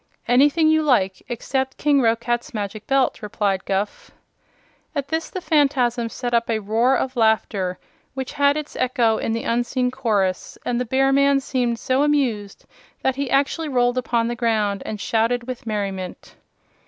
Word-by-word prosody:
"Anything 290 Hz, +6 st, +4 dB
you 315 Hz, 0 st, +4 dB
like, 195 Hz, -11 st, +1 dB
except 265 Hz, +2 st, -2 dB
King 285 Hz, -2 st, +3 dB
Roquat's 235 Hz, +1 st, 0 dB
Magic 210 Hz, 0 st, -5 dB
Belt," 270 Hz, -1 st, +1 dB
replied 200 Hz, -2 st, -1 dB
Guph. 205 Hz, -, -2 dB, 0.9 s
At 280 Hz, -1 st, -2 dB
this 325 Hz, 0 st, -2 dB
the 370 Hz, -, -5 dB
Phanfasm 265 Hz, -7 st, +1 dB
set 245 Hz, +1 st, -4 dB
up 235 Hz, 0 st, +2 dB
a 225 Hz, -, +1 dB
roar 225 Hz, +5 st, +2 dB
of 260 Hz, 0 st, -3 dB
laughter, 215 Hz, -5 st, +1 dB, 0.4 s
which 265 Hz, -1 st, -4 dB
had 285 Hz, 0 st, +3 dB
its 305 Hz, -1 st, -6 dB
echo 240 Hz, -4 st, +1 dB
in -, -, -2 dB
the 230 Hz, +1 st, -2 dB
unseen 245 Hz, +2 st, 0 dB
chorus, 210 Hz, -8 st, -1 dB
and 245 Hz, 0 st, 0 dB
the -, -, -1 dB
bear 270 Hz, +3 st, +2 dB
man 280 Hz, 0 st, +4 dB
seemed 250 Hz, -3 st, -1 dB
so 260 Hz, +3 st, 0 dB
amused 255 Hz, -9 st, 0 dB, 0.4 s
that 265 Hz, -, +1 dB
he 280 Hz, -2 st, -2 dB
actually 280 Hz, +4 st, +1 dB
rolled 245 Hz, -1 st, +2 dB
upon 235 Hz, -2 st, 0 dB
the 240 Hz, -, -2 dB
ground 215 Hz, -4 st, 0 dB
and 215 Hz, -, -4 dB
shouted 230 Hz, +3 st, 0 dB
with 250 Hz, -2 st, -7 dB
merriment. 195 Hz, -4 st, -4 dB
245 Hz, 165 wpm, -22 LUFS, 220-270 Hz, 0.9 s, Anything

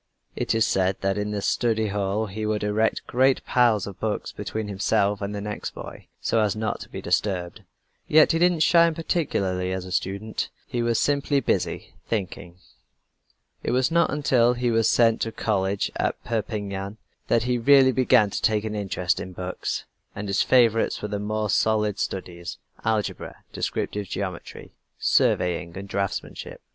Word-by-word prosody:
It -, -, -1 dB
is 110 Hz, 0 st, +3 dB
said 95 Hz, 0 st, +1 dB
that 95 Hz, 0 st, +1 dB
in 105 Hz, 0 st, -2 dB
the 105 Hz, -1 st, -3 dB
study 110 Hz, -2 st, +1 dB
hall 100 Hz, +2 st, -1 dB
he 110 Hz, +1 st, -6 dB
would 105 Hz, -1 st, -1 dB
erect 105 Hz, +2 st, +1 dB
a -, -, -12 dB
great 130 Hz, +1 st, +3 dB
pile 120 Hz, -3 st, +4 dB
of 100 Hz, -2 st, -9 dB
books 110 Hz, -1 st, -2 dB
between 110 Hz, -1 st, -4 dB
himself 100 Hz, 0 st, +1 dB
and 100 Hz, +1 st, -3 dB
the 100 Hz, -, -4 dB
next 105 Hz, 0 st, -5 dB
boy, -, -, -9 dB
so 115 Hz, -, +1 dB
as 105 Hz, -2 st, +1 dB
not 110 Hz, 0 st, -2 dB
to -, -, -10 dB
be -, -, -7 dB
disturbed. 90 Hz, -1 st, -1 dB, 0.5 s
Yet 155 Hz, 0 st, +6 dB
he 165 Hz, -, +1 dB
didn't 175 Hz, -2 st, +3 dB
shine 170 Hz, 0 st, +5 dB
particularly 95 Hz, -, -1 dB
as 95 Hz, -1 st, -3 dB
a 90 Hz, -, -9 dB
student. 100 Hz, +4 st, -2 dB, 0.2 s
He 120 Hz, -, -3 dB
was 115 Hz, -1 st, +1 dB
simply 145 Hz, 0 st, +2 dB
busy 135 Hz, -, -2 dB
thinking. 90 Hz, -4 st, -4 dB, 1.0 s
It -, -, -3 dB
was 130 Hz, +4 st, +2 dB
not 170 Hz, +1 st, +3 dB
until 125 Hz, -4 st, +3 dB
he 120 Hz, 0 st, 0 dB
was 115 Hz, -1 st, +3 dB
sent 115 Hz, -2 st, +3 dB
to 115 Hz, -, -1 dB
college 100 Hz, -3 st, -1 dB
at -, -, 0 dB
Perpignan, 105 Hz, -3 st, -3 dB, 0.3 s
that 115 Hz, -, +2 dB
he 125 Hz, 0 st, 0 dB
really 135 Hz, +1 st, +6 dB
began 120 Hz, -5 st, +4 dB
to -, -, -3 dB
take 105 Hz, -1 st, +2 dB
an 110 Hz, -1 st, -3 dB
interest 95 Hz, -3 st, -1 dB
in 95 Hz, -, -7 dB
books, 90 Hz, +1 st, -4 dB, 0.3 s
and 105 Hz, -, -5 dB
his 100 Hz, +1 st, +1 dB
favorites 115 Hz, -5 st, +3 dB
were 105 Hz, -, -2 dB
the 105 Hz, 0 st, -2 dB
more 105 Hz, +1 st, -1 dB
solid 105 Hz, 0 st, +1 dB
studies 85 Hz, -2 st, -4 dB, 0.3 s
algebra, 110 Hz, -3 st, -2 dB
descriptive 105 Hz, -1 st, -3 dB
geometry, 95 Hz, -2 st, -6 dB, 0.2 s
surveying, 90 Hz, 0 st, +1 dB
and 100 Hz, 0 st, -7 dB
draftsmanship. 100 Hz, 0 st, -4 dB
105 Hz, 170 wpm, -25 LUFS, 100-115 Hz, 1.0 s, Yet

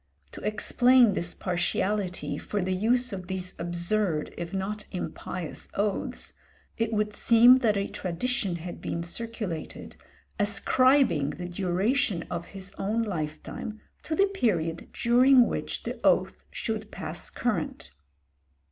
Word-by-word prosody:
To -, -, -10 dB
explain 240 Hz, +2 st, +4 dB
this 175 Hz, -2 st, -3 dB
partiality 185 Hz, +1 st, -1 dB
for 210 Hz, -, -3 dB
the 185 Hz, +1 st, 0 dB
use 240 Hz, +5 st, +1 dB
of 185 Hz, -2 st, -6 dB
these 185 Hz, -1 st, -4 dB
absurd 175 Hz, 0 st, 0 dB
if 170 Hz, 0 st, -5 dB
not 200 Hz, +2 st, -3 dB
impious 180 Hz, -2 st, -5 dB
oaths, 205 Hz, 0 st, -2 dB, 0.4 s
it 225 Hz, -1 st, -1 dB
would 210 Hz, -1 st, 0 dB
seem 240 Hz, +4 st, +7 dB
that 220 Hz, -5 st, +2 dB
a 200 Hz, -, 0 dB
tradition 195 Hz, +1 st, -2 dB
had 175 Hz, +1 st, -7 dB
been 170 Hz, -, -3 dB
circulated, 210 Hz, -3 st, -5 dB, 0.4 s
ascribing 205 Hz, -, +3 dB
the 175 Hz, +4 st, -5 dB
duration 190 Hz, +3 st, 0 dB
of 170 Hz, -1 st, -3 dB
his 195 Hz, -1 st, -8 dB
own 220 Hz, +4 st, 0 dB
lifetime 175 Hz, +3 st, -5 dB, 0.2 s
to 315 Hz, -, -3 dB
the 395 Hz, -, +5 dB
period 180 Hz, -, -1 dB
during 250 Hz, +1 st, +5 dB
which -, -, -3 dB
the -, -, -5 dB
oath -, -, +2 dB
should 220 Hz, -1 st, -4 dB
pass -, -, -5 dB
current. 65 Hz, -, -2 dB
200 Hz, 130 wpm, -27 LUFS, 175-230 Hz, 0.4 s, seem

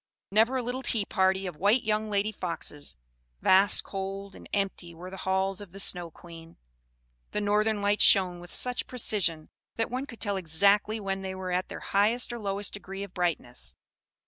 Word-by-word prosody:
Never 225 Hz, +6 st, +4 dB
a 250 Hz, -, -1 dB
little 250 Hz, +2 st, -3 dB
tea 225 Hz, -5 st, +3 dB
party 190 Hz, -1 st, +1 dB
of 180 Hz, -4 st, -5 dB
white 205 Hz, +8 st, +3 dB
young 215 Hz, 0 st, 0 dB
lady 205 Hz, +1 st, +1 dB
foxes; 170 Hz, -6 st, -3 dB, 0.4 s
vast, 195 Hz, +2 st, +5 dB
cold, 195 Hz, 0 st, -5 dB
and -, -, -13 dB
empty 190 Hz, -4 st, -2 dB
were 180 Hz, +3 st, -9 dB
the 190 Hz, -, -7 dB
halls 190 Hz, +1 st, +1 dB
of 190 Hz, -4 st, -11 dB
the 195 Hz, -, -9 dB
Snow 175 Hz, -3 st, +1 dB
Queen. 165 Hz, 0 st, -13 dB, 0.8 s
The -, -, 0 dB
northern 210 Hz, 0 st, +1 dB
lights 205 Hz, +1 st, +3 dB
shone 185 Hz, -3 st, +5 dB
with 175 Hz, 0 st, -11 dB
such 250 Hz, -1 st, +1 dB
precision 185 Hz, -10 st, 0 dB, 0.3 s
that 225 Hz, 0 st, -1 dB
one 260 Hz, +3 st, -3 dB
could 235 Hz, -, -11 dB
tell 200 Hz, -2 st, 0 dB
exactly 200 Hz, +5 st, +3 dB
when 195 Hz, -1 st, -3 dB
they 190 Hz, 0 st, -4 dB
were 185 Hz, -1 st, -4 dB
at 180 Hz, +1 st, 0 dB
their -, -, -8 dB
highest 220 Hz, +5 st, +1 dB
or 240 Hz, -, -5 dB
lowest 200 Hz, -1 st, -2 dB
degree 195 Hz, -1 st, -6 dB
of 200 Hz, -2 st, -9 dB
brightness. 125 Hz, -, -3 dB
195 Hz, 185 wpm, -28 LUFS, 180-210 Hz, 0.8 s, vast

